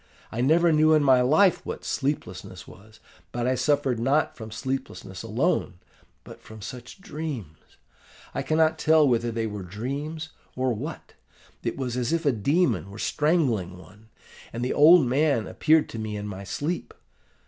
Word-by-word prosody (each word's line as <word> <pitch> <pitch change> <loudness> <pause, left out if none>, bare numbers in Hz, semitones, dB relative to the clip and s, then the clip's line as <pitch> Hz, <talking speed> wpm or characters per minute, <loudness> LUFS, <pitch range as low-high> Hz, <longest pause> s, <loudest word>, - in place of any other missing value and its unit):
I 115 - -2
never 165 +6 +4
knew 155 +1 +5
in 155 -1 +4
my 130 -2 +5
life 160 +9 +4
what - - -6
sleeplessness 95 -11 -4
was; 110 +4 -16 0.3
but 120 0 -2
I 130 - +2
suffered 135 -2 +1
not 135 +6 +1
from 110 -2 -8
sleeplessness 115 -5 -5
alone, 115 - 0 0.5
but - - -12
from 110 0 -12
such 125 - -9
dreams! 140 - -6 0.7
I - - -2
cannot 160 0 +2
tell 155 -1 +5
whether 120 -2 +1
they 115 0 -2
were 105 -2 -5
dreams, 140 - -5 0.3
or 130 -1 0
what; 105 - -7 0.5
it - - -3
was 125 -2 -3
as 125 -1 -1
if 165 -1 0
a 140 - +4
demon 140 - +1
were 100 - -10
strangling 120 - 0
one: 100 +4 -17 0.4
and 120 +2 -3
the 125 - -1
old 160 +1 +7
man 130 -2 +1
appeared 155 +7 +2
to 115 - -6
me 110 -1 -4
in 105 - -5
my 100 -1 -7
sleep. 145 - -4
125 Hz, 165 wpm, -25 LUFS, 110-155 Hz, 0.7 s, old